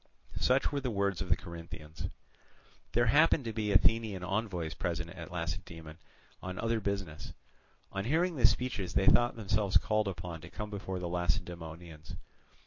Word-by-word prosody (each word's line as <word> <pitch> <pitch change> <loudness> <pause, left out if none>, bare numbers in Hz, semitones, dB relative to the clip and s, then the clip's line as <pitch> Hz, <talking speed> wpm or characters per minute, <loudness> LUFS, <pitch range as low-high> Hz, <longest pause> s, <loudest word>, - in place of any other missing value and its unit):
Such 130 +2 +3
were 145 - 0
the 130 -2 -2
words 100 -4 0
of 95 - -3
the 80 - +5
Corinthians. 85 -3 -7 0.9
There 120 +1 +4
happened 145 +2 +5
to 115 - -3
be 105 -2 -1
Athenian 100 0 +3
envoys 90 -5 -1
present 85 +1 -2
at 90 -1 -8
Lacedaemon 85 -2 -5 0.4
on 95 0 -5
other 115 0 +1
business. 95 -6 -3 0.6
On 95 +1 -3
hearing 165 +6 +2
the 120 -4 +7
speeches 100 -8 -1
they 95 - +4
thought 120 +1 +5
themselves 105 -2 +2
called 110 -1 +1
upon 85 -3 -5
to - - -10
come 105 -1 -6
before 95 -2 -4
the 90 -1 -3
Lacedaemonians. 85 -1 -3
95 Hz, 155 wpm, -32 LUFS, 85-110 Hz, 0.9 s, the